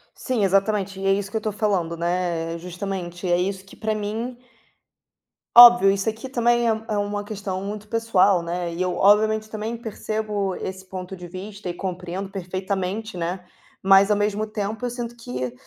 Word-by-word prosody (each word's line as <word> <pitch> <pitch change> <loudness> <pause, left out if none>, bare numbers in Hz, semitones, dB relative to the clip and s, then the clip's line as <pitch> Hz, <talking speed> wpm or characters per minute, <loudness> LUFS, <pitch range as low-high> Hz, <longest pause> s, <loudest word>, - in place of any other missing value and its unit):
Sim, 245 -6 -1
exatamente, 195 0 +1
e 195 - -3
é 195 - +5
isso 195 0 -1
que 220 - -4
eu 220 - +1
tô 215 0 -2
falando, 195 -5 0
né, 170 -1 -1
eh, - - -5
justamente, 180 0 -5
é 175 - +4
isso 190 +1 -2
que, 195 - -15
pra 220 0 -1
mim 220 +4 -4 1.2
óbvio, 240 -4 +10
isso 195 +2 0
aqui 225 +4 -6
também 240 -1 +2
é 225 - +4
um 220 0 -6
é 210 - 0
uma 205 0 -2
questão 200 -3 -4
muito 210 +1 -6
pessoal, 205 -5 +3
né, 170 0 -3
e 170 - -4
eu 180 -1 0
obviamente 215 +2 +4
também 215 +2 -4
percebo 215 -3 -3
esse 190 0 -6
ponto 185 0 -7
de 180 -1 -9
vista 195 +3 -8
e - - -2
compreendo 185 +1 -5
perfeitamente, 190 +2 -3
né, 175 +2 -3 0.4
mas, 195 +1 +6
ao 210 - +3
mesmo 210 +1 0
tempo, 215 +2 -3
eu - - -1
sinto 240 -1 -5
que 125 - -5
200 Hz, 190 wpm, -23 LUFS, 185-215 Hz, 1.2 s, óbvio